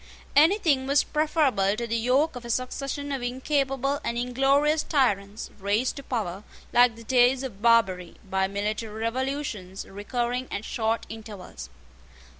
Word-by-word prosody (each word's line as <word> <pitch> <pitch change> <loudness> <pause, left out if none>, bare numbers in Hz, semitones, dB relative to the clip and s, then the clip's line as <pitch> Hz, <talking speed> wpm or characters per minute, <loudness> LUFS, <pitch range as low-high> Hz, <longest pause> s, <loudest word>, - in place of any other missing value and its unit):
Anything 305 -4 +4
was 280 +1 +4
preferable 295 -10 +1
to 235 +2 -3
the 230 0 -2
yoke 255 +7 +2
of 245 - -7
a 235 - -8
succession 275 +4 -3
of 270 -2 -2
incapable 270 +2 -1
and 235 - -2
inglorious 270 +5 +2
tyrants, 210 - 0
raised 205 +6 0
to - - -5
power, 210 -8 -3 0.3
like 245 -1 +5
the 230 - -12
Deys 250 +2 +3
of 215 -7 -7
Barbary, 195 -7 +3
by 190 0 +1
military 210 +2 -3
revolutions 230 -5 -3
recurring 240 +5 -3
at 200 +2 -4
short 225 0 -1
intervals. 200 - -9
245 Hz, 140 wpm, -26 LUFS, 210-270 Hz, 0.3 s, like